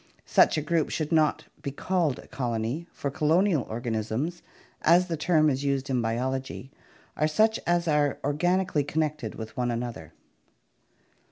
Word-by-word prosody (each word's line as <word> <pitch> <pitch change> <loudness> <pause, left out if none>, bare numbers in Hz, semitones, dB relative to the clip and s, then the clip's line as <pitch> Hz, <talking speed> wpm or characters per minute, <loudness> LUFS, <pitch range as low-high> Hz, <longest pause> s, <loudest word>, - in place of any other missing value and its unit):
Such - - +4
a 155 - -1
group 160 0 +1
should 155 0 -2
not 155 -2 +2 0.2
be 140 - -3
called 165 0 0
a - - -11
colony, 125 +4 -3
for 140 - -4
colonial 155 +1 +2
organisms, 120 +8 -2 0.4
as 175 +3 +5
the 165 - 0
term 155 0 +3
is 135 -1 0
used 140 -1 -1
in 125 -2 +1
Biology, 130 +3 -3 0.4
are 155 - +2
such 220 +8 +2
as 175 0 +2
are 150 -2 +2
organically 175 +2 +1
connected 155 +1 -2
with 110 -1 -8
one 125 -1 0
another. 115 -9 -4
145 Hz, 150 wpm, -27 LUFS, 125-165 Hz, 0.4 s, as